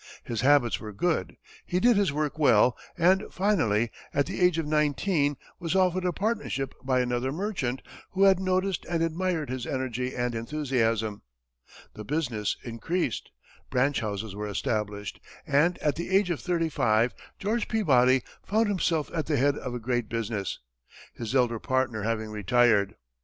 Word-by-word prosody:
His 115 -3 -3
habits 135 -3 +4
were 110 - -7
good, 170 - -1 0.3
he 180 - -1
did 240 +3 +5
his 200 -6 +2
work 150 +1 -2
well, 125 -4 +5 0.2
and 185 +3 +4
finally, 120 - +1 0.2
at 140 0 +3
the 190 +1 -5
age 180 -2 +4
of 165 - -1
nineteen, 150 0 +1 0.2
was 175 0 -2
offered 185 -1 +2
a 180 - +2
partnership 200 - -2
by 130 -1 +2
another 125 +1 -1
merchant, 150 - -2 0.3
who 195 +1 +2
had 195 -2 +6
noticed 185 0 0
and 165 -1 +1
admired 165 -3 -1
his 130 -1 -4
energy 130 -2 -2
and 120 -1 -1
enthusiasm. 115 -4 -1 0.7
The 105 - -8
business 120 -6 -1
increased, 130 +3 -2 0.4
branch 135 +2 +2
houses 105 -1 -4
were 105 +1 -4
established, 105 -2 -3 0.3
and 155 +4 +3
at 150 -1 +1
the 170 - -4
age 190 -1 +3
of 165 - -2
thirty 170 -2 0
five, 115 -4 +2 0.2
George 215 +3 -1
Peabody 130 - +3 0.2
found 220 +1 +1
himself 165 -6 0
at 160 -3 -2
the 150 -2 +1
head 140 +2 +3
of 125 -4 -5
a - - -3
great 120 -1 -1
business, 110 -3 -2 0.6
his 115 +2 -5
elder 120 -3 +2
partner 130 -4 0
having 110 0 -2
retired. 105 -1 +3
135 Hz, 160 wpm, -27 LUFS, 115-175 Hz, 0.7 s, had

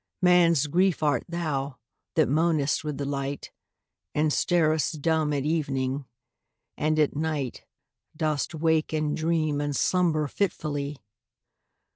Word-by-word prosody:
Man's 170 -4 +5
Grief 175 +2 +1
art 145 -1 +1
thou, 145 -6 -2 0.4
that 160 - +4
moanest 155 0 +1
with 150 -2 -4
the 140 - -3
light, 140 0 -4 0.6
And 150 0 +2
starest 155 -3 +1
dumb 160 -2 +2
at 140 -2 0
evening 140 -3 -1 0.4
— - - -56 0.3
and 155 +1 0
at 150 -2 +2
night 150 -4 -3 0.5
Dost 155 0 -1
wake 160 0 +1
and 155 -1 0
dream 155 -2 0
and 145 -1 -2
slumber 165 -4 +2
fitfully 145 -5 -2
155 Hz, 125 wpm, -26 LUFS, 145-160 Hz, 0.6 s, Man's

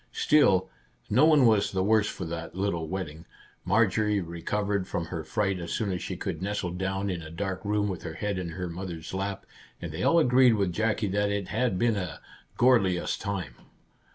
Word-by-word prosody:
Still, 100 -12 +4 0.4
no 130 +8 +5
one 150 -5 +6
was 110 -3 +3
the 95 -1 0
worse 105 +1 +3
for 90 - -5
that 85 +1 -6
little 95 -4 -1
wetting, 80 -3 -5 0.4
Marjorie 105 -1 +2
recovered 95 +3 -2
from 85 - -2
her 80 -1 -5
fright 100 +3 -1
as 85 -1 -5
soon 105 -3 -1
as 90 -2 -3
she - - -4
could - - -4
nestle 100 -2 -2
down 95 +2 -2
in 90 -3 -3
a 80 - -9
dark 95 +2 -4
room 105 0 0
with 95 -4 -4
her 80 - -6
head 100 -2 -2
in 90 -2 -4
her 90 +2 -4
mother's 85 -1 -6
lap, 95 +1 -3 0.3
and 85 -2 -6
they 80 +4 -5
all 165 - +4
agreed 125 -5 +5
with 100 -4 0
Jackie 110 0 0
that 100 +1 +1
it 100 -2 -2
had 115 -4 0
been 115 0 +2
"a 90 -3 -4 0.4
gorlious 105 -8 +3
time." 95 - -4
95 Hz, 195 wpm, -27 LUFS, 90-105 Hz, 0.4 s, one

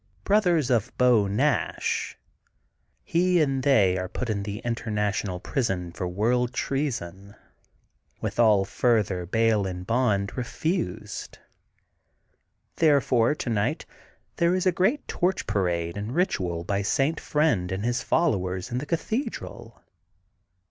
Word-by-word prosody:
brothers 175 - +2
of 115 -4 +1
Beau 120 -5 +4
Nash,'' 100 +1 0 0.9
he 180 +1 +2
and 135 -4 +1
they^are 95 -9 +2
put 125 -3 -3
into 100 -2 -2
the 100 +1 -5
InternationM 105 -5 -2
Prison 95 -10 -2
for 90 +1 -4
world 120 +7 0
treason, 100 - -3 0.8
with - - -4
all 105 -4 +5
further 100 -6 0
bail 110 -1 +2
and 90 -1 -6
bond 110 -4 +1
re 125 - -2
fused. 160 - -3 1.4
Therefore 140 -5 +3
tonight 115 -8 -1 0.5
there 170 +1 +3
is 185 - -1
a 185 - +5
great 190 - 0
torch 185 +2 0
parade 85 -5 -1
and 105 +5 -5
ritual 90 - 0
by 100 +3 -1
St. 135 +10 0
Friend 150 - +1
and 95 +3 -3
his 120 +1 0
followers 95 - 0
in 125 - -1
the 145 - -6
cathedral. 220 - -4
115 Hz, 120 wpm, -26 LUFS, 95-145 Hz, 1.4 s, all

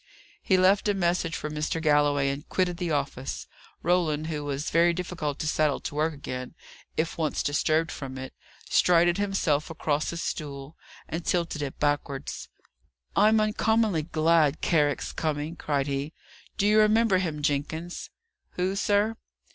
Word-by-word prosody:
He 190 - +3
left 195 +3 +4
a 205 - +2
message 170 -2 0
for - - -4
Mr. 155 +2 -2
Galloway, 145 -3 +3
and 140 +2 -7
quitted 180 -2 0
the 175 -1 -2
office. 140 -3 -2 0.4
Roland, 165 -3 +1
who 155 -2 -3
was 145 +1 -3
very 170 +1 +4
difficult 165 -5 -3
to 155 - -3
settle 150 -2 +1
to - - -5
work 155 +2 +1
again, 130 -2 -6 0.4
if 165 +1 -1
once 155 -2 0
disturbed 155 +3 +1
from 130 -2 -6
it, 130 0 -7 0.3
strided 175 +1 +4
himself 185 -7 0
across 155 -2 -1
his 170 0 -4
stool, 140 0 -5 0.3
and 165 +1 -4
tilted 170 -4 -1
it 140 -2 -4
backwards. 145 -1 -2 0.7
"I'm 215 +1 +5
uncommonly 215 -4 +2
glad 155 -1 +2
Carrick's 150 -4 +1
coming!" 155 +1 -2
cried 145 -4 -1
he. 140 +2 -3 0.4
"Do 200 - +1
you 210 +1 +5
remember 215 -2 +4
him, 155 -5 -3
Jenkins?" 155 +4 -2 0.4
"Who, 185 +2 -1
sir?" 205 +2 +1
160 Hz, 150 wpm, -27 LUFS, 145-180 Hz, 0.7 s, I'm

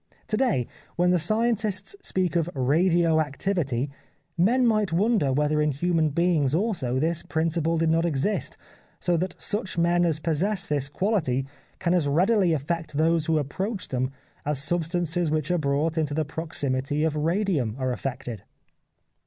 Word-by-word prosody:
To 215 - +2
day, 140 - +1 0.3
when 180 +1 +3
the 180 - +3
scientists 215 - 0
speak 185 - -1
of 170 0 +1
radio 165 +4 +3
activity, 145 -4 -1 0.4
men 235 +9 +3
might 215 -5 +2
wonder 190 - +2
whether 150 +2 +1
in 150 - +2
human 160 +2 +1
beings 155 -3 +1
also 165 - -1
this 165 +4 +1
principle 165 +1 0
did 160 0 +2
not 165 +1 +2
exist 170 +5 -1 0.4
so 175 - +1
that 180 +1 -3
such 205 -4 -1
men 175 +1 +3
as 165 -3 +2
possess 180 +6 0
this 140 -2 -1
quality 145 - 0 0.3
can 175 -2 0
as 170 -5 +2
readily 185 +5 +3
affect 160 +1 -2
those 160 +1 +2
who 160 -1 +2
approach 190 - -3
them 130 0 -1 0.3
as 150 -2 0
substances 170 +2 0
which 155 +2 0
are 175 - +2
brought 150 +3 0
into 150 -2 -1
the 155 0 0
proximity 145 -2 -1
of 160 -1 0
radium 160 - 0
are 130 -1 -1
affected. 125 -4 -5
165 Hz, 155 wpm, -25 LUFS, 145-180 Hz, 0.4 s, when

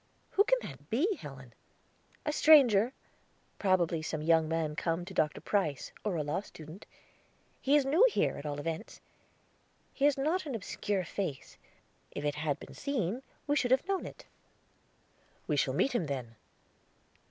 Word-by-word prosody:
"Who 405 - +5
can - - +4
that - - -10
be, 330 - +1
Helen?" 135 -4 -10 0.7
"A 300 - 0
stranger; 255 -9 +6 0.7
probably 175 -4 +2
some 155 0 -3
young 160 -1 +3
man 160 -2 -1
come 170 +1 -1
to 190 - -9
Dr. 155 -4 0
Price, 155 -10 -1
or 210 -4 -1
a 155 - 0
law 150 +6 -1
student. 160 -1 -12 0.7
He 275 +2 +3
is 290 -2 +4
new 310 - +4
here, - - +1
at - - -7
all 145 0 -3
events. 165 +7 -5 0.9
His 285 +1 +3
is 270 - -2
not 320 +2 0
an 270 - -3
obscure 200 -2 -2
face; 165 -6 -4 0.5
if 145 - -5
it 145 - +1
had 150 -1 -2
been - - -11
seen, 250 - -2 0.2
we 290 - +1
should 250 -4 +1
have 260 +7 +3
known 390 -1 -1
it." - - -12 1.2
"We - - 0
shall - - +1
meet 275 - +2
him, 180 -10 0
then." 130 -5 -4
190 Hz, 165 wpm, -31 LUFS, -, 1.2 s, stranger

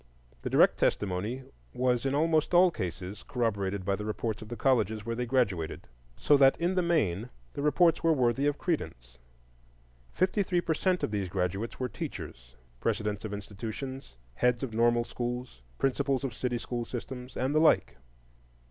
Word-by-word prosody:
The - - -3
direct - - +4
testimony 105 +7 0 0.3
was 125 0 +1
in 135 - 0
almost 160 +2 +2
all 180 0 +7
cases 95 - -5
corroborated 100 -7 -2
by 100 0 +1
the 105 - -5
reports 110 +1 -3
of 110 - -8
the 120 - -4
colleges 110 -4 +1
where 115 0 -2
they 125 +1 -2
graduated, 100 -11 0 0.3
so 145 - +4
that 135 -1 +6
in 175 +2 +1
the 185 - +2
main 125 - +1 0.2
the - - -4
reports 165 +4 +3
were 165 - +4
worthy 135 -1 +2
of 145 0 0
credence. - - -3 0.9
Fifty 185 +3 +1
three 180 -2 +1
per 170 -2 0
cent 180 +3 0
of - - 0
these 100 -3 -2
graduates 95 +4 -2
were 130 - 0
teachers,—presidents 65 - -5
of 110 - -4
institutions, 110 - -6 0.2
heads 125 - +1
of 125 -4 -4
normal 120 +1 +3
schools, 120 - -5 0.2
principals 135 0 0
of 135 -4 -2
city 120 0 -2
school 120 0 -3
systems, 125 +1 -7
and 130 +3 0
the 155 - +4
like. 160 - +3
120 Hz, 165 wpm, -29 LUFS, 105-140 Hz, 0.9 s, all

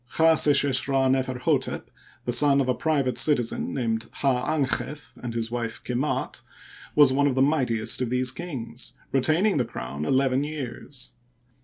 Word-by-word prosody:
Chdseshesh 145 -4 +4
Rd 135 -1 +2
Neferhdtep, 130 -1 -1 0.4
the 120 - 0
son 140 +2 +4
of 135 - +1
a 130 - +2
private 140 -3 0
citizen 125 -7 +1
named 115 -4 -2
Hd 135 +2 +1
dnchef 145 +3 -3
and 120 -1 -5
his 115 0 -2
wife 120 -2 -3
Kemdt, 125 +4 -2 0.5
was 145 -3 +6
one 145 +1 +2
of 135 - 0
the 130 - +2
mightiest 125 -6 0
of 125 - -1
these 125 0 +1
kings, 130 -7 -6 0.2
retaining 155 +9 +2
the 125 - +2
crown 70 - -6
eleven 135 - +2
years. 140 -2 -6
130 Hz, 150 wpm, -25 LUFS, 120-145 Hz, 0.5 s, was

